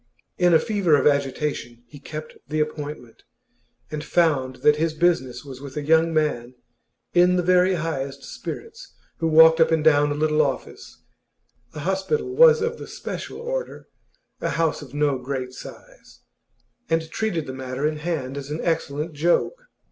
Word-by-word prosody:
In 180 -1 +4
a 165 - +7
fever 190 -4 +2
of 140 - +1
agitation 140 -4 -1
he 130 +5 -14
kept 155 +2 -8
the 155 0 -2
appointment, 150 -5 -5 0.7
and 150 -1 -4
found 145 -7 +1
that 150 0 +6
his 160 0 -1
business 140 -7 0
was 135 -2 -10
with 140 0 -9
a 150 - -2
young 160 +2 +3
man 135 -6 -1 0.6
in 180 +1 +5
the 180 - +1
very 180 +1 +4
highest 140 -5 -4
spirits, 455 +2 -8 0.2
who 165 - 0
walked 160 +1 +7
up 160 0 +5
and 160 -2 +1
down 145 -2 +4
a - - -1
little 155 0 +2
office 140 -3 -4 0.7
(the 150 - -7
hospital 190 - -1
was 470 0 +6
of 470 +1 -2
the - - -8
'special' - - -7
order, - - -5 0.5
a - - -2
house 165 -2 0
of 145 -1 -11
no 145 -3 +1
great 130 0 -4
size), - - -13 0.7
and 165 -1 0
treated 180 -8 -2
the 130 - -6
matter 130 +1 -4
in 155 0 0
hand 150 -4 -3
as 140 0 -9
an 150 +2 -4
excellent 160 -1 -2
joke. 175 - 0
155 Hz, 165 wpm, -23 LUFS, 140-170 Hz, 0.7 s, a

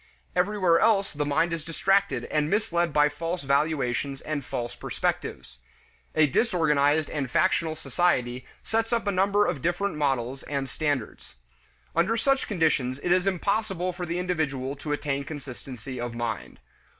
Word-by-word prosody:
Everywhere 180 -2 +3
else 205 -3 +3
the 145 0 -2
mind 165 +4 +2
is 165 -2 -3
distracted 165 -5 +1
and 150 0 +1
misled 175 -5 +1
by 150 0 +5
false 165 +4 -4
valuations 140 -1 0
and 150 -2 -3
false 120 -1 -4
perspectives. 65 -2 -3 0.6
A 155 - +6
disorganized 150 - +2
and 140 -4 -3
factional 165 +1 +2
society 130 -7 0 0.2
sets 225 +1 0
up 230 -2 +1
a 200 - +1
number 200 +2 +3
of 160 -7 -1
different 175 +3 0
models 135 -3 0
and 140 -2 -3
standards. 145 -4 -3 0.6
Under 190 +8 +2
such 275 +3 +2
conditions 155 - +1
it 175 - 0
is 180 +1 +3
impossible 195 -1 0
for 175 0 -5
the 170 +2 -2
individual 145 -7 -1
to 150 +2 -5
attain 145 -1 -1
consistency 130 -3 -7
of 120 -1 -4
mind. 115 -3 -4
155 Hz, 150 wpm, -26 LUFS, 135-180 Hz, 0.6 s, A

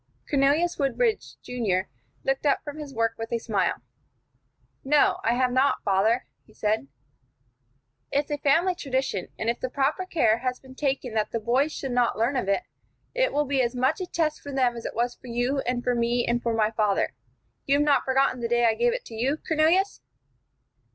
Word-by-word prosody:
Cornelius 295 +5 +2
Woodbridge, 430 - 0
Junior, 200 -7 -1 0.4
looked 270 0 0
up 290 - +2
from 295 +1 -7
his 295 -2 -7
work 230 -2 0
with 225 0 -5
a 235 - +1
smile. 200 - -1 1.0
"No, 290 +1 +3
I 235 - +2
have 250 0 +2
not, 260 +3 +2
father," 210 +5 +2 0.2
he 215 - -23
said. 210 -9 0 1.2
"It's 285 +1 0
a 290 - -1
family 330 +7 +3
tradition; 265 - -2
and 220 - -3
if 235 +1 0
the 255 - -3
proper 280 +8 0
care 235 -11 +2
has 255 0 -2
been 260 -1 -14
taken 265 -3 -2
that 215 -1 0
the 230 - -2
boys 255 +7 +1
should 270 -3 -5
not 245 -1 +1
learn 235 +5 +1
of 200 -7 -1
it, 200 - +1 0.5
it - - +1
will 295 0 +1
be 270 -1 +1
as 240 0 -1
much 255 +8 +1
a 365 - -3
test 315 -3 -1
for 285 - -8
them 255 -3 +1
as 230 - -8
it - - -5
was 240 +1 0
for - - -15
you 245 +4 0
and 245 0 -1
for 250 - +1
me 240 0 +1
and 235 0 +1
for 235 -1 -1
my 215 -1 +2
father. 210 -3 +1 0.5
You 275 - +4
have 295 +1 +2
not 290 -2 +3
forgotten 265 -1 +1
the 235 - -1
day 240 0 +2
I 225 - +4
gave 480 - +1
it - - -5
to - - -11
you, 255 +7 0
Cornelius?" 330 +5 +2
255 Hz, 205 wpm, -26 LUFS, 235-285 Hz, 1.2 s, You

